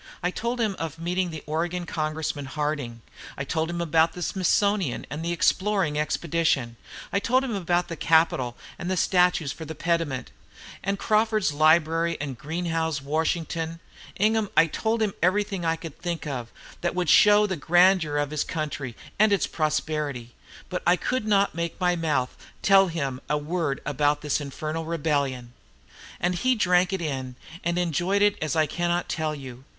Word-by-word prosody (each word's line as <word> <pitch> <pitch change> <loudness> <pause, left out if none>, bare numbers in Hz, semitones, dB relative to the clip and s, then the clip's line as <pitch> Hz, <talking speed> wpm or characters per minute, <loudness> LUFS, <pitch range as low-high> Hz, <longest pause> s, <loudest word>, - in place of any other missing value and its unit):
I 180 - +1
told 235 +5 -3
him 215 -4 0
of 165 -1 -4
meeting 180 +2 -1
the 160 -2 -7
Oregon 170 +3 -2
Congressman, 155 -3 -3
Harding; 140 -4 -3 0.4
I 140 - -2
told 160 +4 -1
him 170 0 -3
about 165 0 +3
the 180 - -5
Smithsonian, 190 - +1
and 150 +3 -4
the 170 - -1
Exploring 185 -3 +1
Expedition; 150 -5 0 0.4
I 200 - +3
told 255 +5 +2
him 255 -4 -3
about 175 -2 0
the 170 - -5
Capitol, 160 -6 +2 0.2
and 175 - -4
the 185 - 0
statues 180 -5 +2
for 160 - -8
the 160 0 -7
pediment, 165 -4 -1 0.5
and 195 0 -1
Crawford's 215 -5 +2
Liberty, 165 +2 +3
and 140 -3 -4
Greenough's 160 +1 -2
Washington: 160 +3 -2 0.4
Ingham, 215 0 +2
I - - +8
told 220 +7 -1
him 205 -3 0
everything 195 0 +1
I 165 0 +2
could 165 -2 -9
think 170 -1 -4
of 125 -6 -5 0.3
that 175 +1 -1
would 180 -2 0
show 210 +5 +6
the 190 -2 -2
grandeur 175 -1 +3
of 145 0 -1
his 155 -1 0
country 145 -6 -4 0.2
and 215 0 +5
its 200 - +3
prosperity; 150 -5 -2 0.3
but 180 - -3
I 175 - +6
could 240 +4 -2
not 200 -1 +3
make 170 0 -2
up - - -27
my 180 -1 +3
mouth 150 -7 -1
to - - -17 0.2
tell 195 0 +7
him 140 -6 -3
a 150 - +2
word 150 -1 -2
about 145 +1 +1
this 150 0 0
infernal 155 +3 -4
rebellion! 140 -7 -1 0.7
"And 175 +1 +1
he 255 +8 +2
drank 180 -3 +3
it 190 -3 -2
in 130 -4 -4 0.3
and 175 +1 0
enjoyed 180 +4 +1
it 205 -1 +4
as 155 -1 -1
I 155 -1 +4
cannot 175 +2 -1
tell 155 -1 -2
you. 130 -3 -9
165 Hz, 175 wpm, -25 LUFS, 150-180 Hz, 0.7 s, I